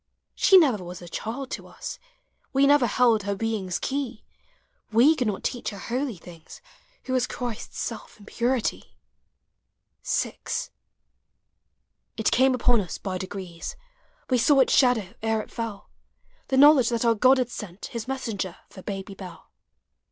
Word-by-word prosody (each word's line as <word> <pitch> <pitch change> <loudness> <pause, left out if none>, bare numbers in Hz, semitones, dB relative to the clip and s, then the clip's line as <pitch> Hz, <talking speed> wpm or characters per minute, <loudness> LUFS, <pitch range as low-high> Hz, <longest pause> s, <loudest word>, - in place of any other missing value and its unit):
She 385 - +6
never 255 - +4
was 180 0 -8
a - - -9
child 245 +9 -5
to - - -6
us, - - -8 0.5
We 275 +1 +4
never 285 -3 +5
held 230 -1 +3
her 200 0 -2
being's 200 -4 -2
key; 265 -5 -3 0.7
He 250 +9 +6
could 250 -6 -1
not 205 -2 -3
teach 245 - -2
her 205 - -8
holy 245 +2 -3
things 165 -1 -13 0.4
Who 260 - -4
was 255 -1 +2
Christ's 240 -3 -6
self 230 -2 -6
in 205 - -15
purity. 245 +2 -1 1.1
VI. - - -1 1.8
It 220 - +1
came 260 +1 +4
upon 245 -2 +3
us 180 - -6
by 185 -2 -4
degrees, 185 - -6 0.5
We 250 -2 +2
saw 270 +3 +5
its - - +2
shadow 245 -8 +3
ere 220 0 +1
it - - -16
fell 230 -4 -6 0.3
— - - -38
The 265 - 0
knowledge 280 -3 +7
that 235 0 0
our 230 - +5
God 255 +5 +5
had 250 -2 -1
sent 200 -5 -7
His 230 -1 -4
messenger 220 -9 -3
for 190 - -11
Baby 195 0 -6
Dell. 185 -3 -11
230 Hz, 160 wpm, -25 LUFS, 200-260 Hz, 1.8 s, knowledge